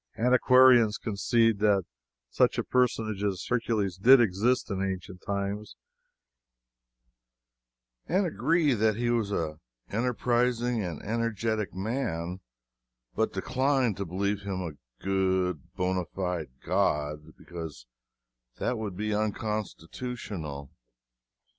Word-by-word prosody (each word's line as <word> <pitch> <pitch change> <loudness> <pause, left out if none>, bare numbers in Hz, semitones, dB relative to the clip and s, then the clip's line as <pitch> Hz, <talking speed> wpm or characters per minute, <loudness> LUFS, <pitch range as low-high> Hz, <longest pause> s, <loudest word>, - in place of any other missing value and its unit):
Antiquarians 125 -2 +5
concede 115 0 +1
that 105 -2 +3 0.5
such - - +3
a - - +1
personage 110 -5 0
as 95 -3 -1
Hercules 110 -6 0
did 125 +7 +7
exist 115 +3 +1
in 95 -1 -2
ancient 95 -1 -4
times 100 +1 -3 2.3
and 190 +3 +2
agree 165 -3 +2
that 110 -1 +2
he 120 +1 0
was 115 -4 0
an 80 -6 -2 0.3
enterprising 120 0 +1
and 85 -5 -5
energetic 110 -1 -1
man, 95 -5 -3 0.7
but 110 - 0
decline 130 +3 +1
to 100 - -4
believe 100 +3 -2
him 100 -2 -3
a 70 -7 -11
good, 95 -5 0
bona 90 -1 0
fide 90 -6 -3
god, 75 +1 -1
because 80 -8 -8 0.7
that 125 - -1
would 100 -4 -5
be 105 +1 -1
unconstitutional. 105 - -4
105 Hz, 105 wpm, -28 LUFS, 95-120 Hz, 2.3 s, did